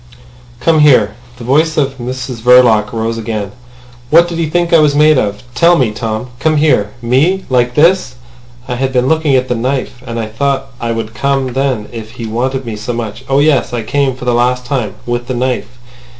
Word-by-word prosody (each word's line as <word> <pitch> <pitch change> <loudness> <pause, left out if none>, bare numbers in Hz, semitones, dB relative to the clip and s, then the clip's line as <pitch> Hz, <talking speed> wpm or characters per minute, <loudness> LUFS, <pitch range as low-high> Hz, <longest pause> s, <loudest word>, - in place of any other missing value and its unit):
"Come 155 +6 +2
here." 125 -9 +4 0.2
The 120 - -10
voice 155 +6 +1
of 135 -2 -1
Mrs 125 -1 -5
Verloc 120 -3 +5
rose 115 0 -2
again. 110 -3 -4 0.6
"What 170 +4 +5
did 170 -1 -5
he 165 - 0
think 175 +1 0
I 165 - +7
was 150 -2 +3
made 150 -1 +5
of? 105 -3 -3
Tell 170 +4 +4
me, 125 -5 +1
Tom. 110 +2 -4
Come 155 +2 +1
here! 145 -9 +2
Me! 150 +11 +1
Like 125 -1 +1
this! 165 -4 +3 0.5
I 125 -2 -3
had 135 +1 -1
been 125 0 +1
looking 160 -2 +2
at 130 0 +1
the 125 - 0
knife, 125 +1 -3
and 115 -1 -4
I 115 - -2
thought 135 +4 -2
I 115 0 -2
would 115 -1 -4
come 135 +2 -1
then 130 -5 -1
if 115 -1 -8
he 120 -2 -7
wanted 130 +4 -2
me 115 -2 -5
so 110 +3 -4
much. 115 +1 -5
Oh 135 - +2
yes! 140 -4 +2
I 120 -2 -2
came—for 130 +1 -1
the 125 - +1
last 125 +1 +1
time.... 120 -5 -2
With 120 0 -3
the 130 - -3
knife." 125 0 -3
125 Hz, 205 wpm, -14 LUFS, 115-140 Hz, 0.6 s, I